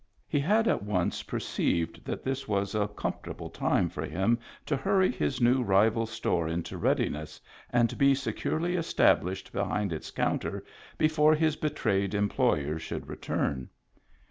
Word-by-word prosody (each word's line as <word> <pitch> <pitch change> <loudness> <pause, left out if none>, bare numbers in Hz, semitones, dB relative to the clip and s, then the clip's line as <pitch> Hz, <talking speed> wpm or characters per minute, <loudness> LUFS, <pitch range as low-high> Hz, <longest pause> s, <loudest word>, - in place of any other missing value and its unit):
He 145 - +1
had 215 +10 +3
at - - +2
once 100 -4 -1
perceived 85 -1 -2
that - - -4
this 135 +1 -3
was 100 -1 0
a 105 -1 +1
comfort 105 - -5
able - - -7
time - - +1
for - - -5
him 95 +9 +1 0.3
to 145 - 0
hurry 190 +6 +2
his 75 - -1
new 125 +2 +4
rival 110 +1 +3
store 100 -7 -1
into 80 +1 -3
readiness 75 +1 -1 0.3
and 120 -1 +2
be 140 0 +5
securely 165 +5 -1
established 95 - +1
behind 100 -4 -1
its 80 - -6
counter - - -2 0.3
before 155 0 +4
his 155 -1 +2
betrayed 100 -10 0
employer 80 -7 +1
should - - -5
return. 65 -2 -2
110 Hz, 145 wpm, -29 LUFS, 95-145 Hz, 0.3 s, be